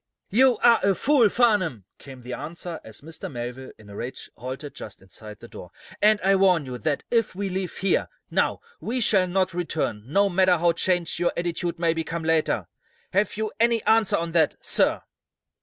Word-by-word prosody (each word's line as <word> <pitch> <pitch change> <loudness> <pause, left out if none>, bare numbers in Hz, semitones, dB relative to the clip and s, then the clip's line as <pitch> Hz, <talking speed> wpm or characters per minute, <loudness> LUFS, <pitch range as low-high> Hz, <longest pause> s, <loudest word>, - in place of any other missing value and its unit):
"You're 250 +3 +4
a 225 -5 +4
fool, 265 -4 +3
Farnum!" 185 - +1
came 130 -3 -12
the 125 +1 -6
answer 165 +4 -7
as 110 -1 -11
Mr. 160 +1 -9
Melville, 125 +1 -6
in 105 - -17
a 100 - -11
rage, 120 +5 -7
halted 130 +4 -7
just 105 - -10
inside 105 +3 -12
the 120 - -12
door. 90 - -11 0.3
"And 215 0 +5
I 195 +1 +3
warn 185 -6 +3
you 125 -1 -6
that, 150 0 -1
if 230 -5 +1
we 200 0 -3
leave 185 -1 -4
here, 195 -1 +1 0.2
now, - - 0 0.2
we 250 +3 -3
shall 195 -5 +4
not 185 0 0
return, 160 -10 -2
no 200 +4 +4
matter 185 -1 +3
how 170 +1 +3
changed 175 -1 0
your 175 - +1
attitude 170 0 -2
may 165 -1 +1
become 165 0 -4
later. 160 -1 +1 0.5
Have 205 +2 +1
you 220 -1 -2
any 230 -1 +2
answer 220 -2 +3
to 170 - -1
that, 160 -2 +2
sir?" - - +1
175 Hz, 185 wpm, -24 LUFS, 140-200 Hz, 0.5 s, And